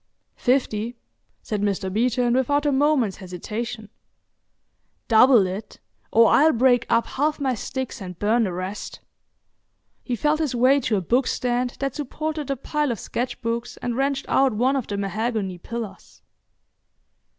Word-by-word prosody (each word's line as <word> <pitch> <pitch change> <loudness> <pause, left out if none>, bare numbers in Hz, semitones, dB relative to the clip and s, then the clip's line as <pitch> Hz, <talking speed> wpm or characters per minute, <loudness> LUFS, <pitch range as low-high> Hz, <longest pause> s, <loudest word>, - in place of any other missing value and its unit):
"Fifty," 245 -3 0 0.5
said 210 -2 -3
Mr. 195 -2 -1
Beeton, 240 +2 +1
without 285 +3 +1
a 290 - +3
moment's 270 -7 +2
hesitation. 215 +5 -6 1.2
"Double 230 -2 +6
it; 190 +4 -6 0.3
or 230 0 +6
I'll 315 +2 +5
break 245 0 +3
up 230 0 +3
half 300 +3 -1
my 270 -2 0
sticks 260 +1 -5
and 180 -2 -7
burn 225 +4 +2
the 190 - -2
rest." 185 +3 -5 1.0
He 245 - -2
felt 300 +6 +1
his 295 -6 -1
way 260 +4 +4
to 230 -5 0
a - - -1
bookstand 245 +3 0
that 275 -2 -2
supported 305 +1 -4
a 275 - 0
pile 295 +2 -1
of 225 - -4
sketch 245 +2 -4
books, 230 +1 -3
and 240 -1 -3
wrenched 275 +1 0
out 270 -2 +3
one 250 +6 +2
of 265 -4 -2
the 200 - -3
mahogany 200 -1 -2
pillars. 230 +1 -8
240 Hz, 150 wpm, -23 LUFS, 215-270 Hz, 1.2 s, Double